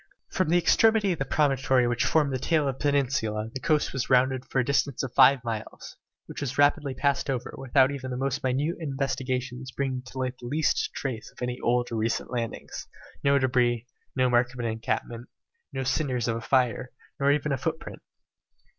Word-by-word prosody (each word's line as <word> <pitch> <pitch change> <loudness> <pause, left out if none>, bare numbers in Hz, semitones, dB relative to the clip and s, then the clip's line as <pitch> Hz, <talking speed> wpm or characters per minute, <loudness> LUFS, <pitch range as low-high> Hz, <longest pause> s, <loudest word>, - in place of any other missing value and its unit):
From 185 -4 0
the 175 - +4
extremity 215 +3 +4
of 170 - -2
the 135 - -1
promontory 135 -3 +2
which 120 0 0
formed 150 -3 +2
the 130 - -1
tail 155 +1 +1
of 135 -1 -3
the - - -4
peninsula 120 -6 0
the 130 - -4
coast 150 +2 +1
was 135 -3 -2
rounded 130 0 +3
for - - -3
a 130 - +3
distance 140 -1 0
of 130 - -5
five 135 -1 +6
miles, 115 -3 -6 0.3
which - - -8
was 135 -3 -3
rapidly 145 -1 +3
passed 140 +1 0
over, 130 -3 -3
without 135 +1 +3
even 130 -2 -5
the 125 - -3
most 135 0 -2
minute 140 +6 0
investigations 130 -3 -3
bringing 130 0 -2
to 130 - -10
light 130 0 -3
the 120 - -8
least 150 +4 +1
trace 125 -5 -4
of - - -10
any 125 0 -3
old 120 0 0
or 115 - -2
recent 110 +1 -1
landings; 115 -3 -5 0.4
no 140 0 +4
debris, 125 -3 +1 0.3
no 130 -1 +3
mark 120 0 +2
of - - -10
an 120 - -2
encampment, 115 +1 -3 0.4
no 135 - -3
cinders 130 -2 0
of 115 - 0
a 115 - -4
fire, 125 0 +1 0.3
nor 140 0 +3
even 150 0 0
a 140 - +1
footprint! 160 +4 -4
130 Hz, 200 wpm, -27 LUFS, 125-140 Hz, 0.4 s, five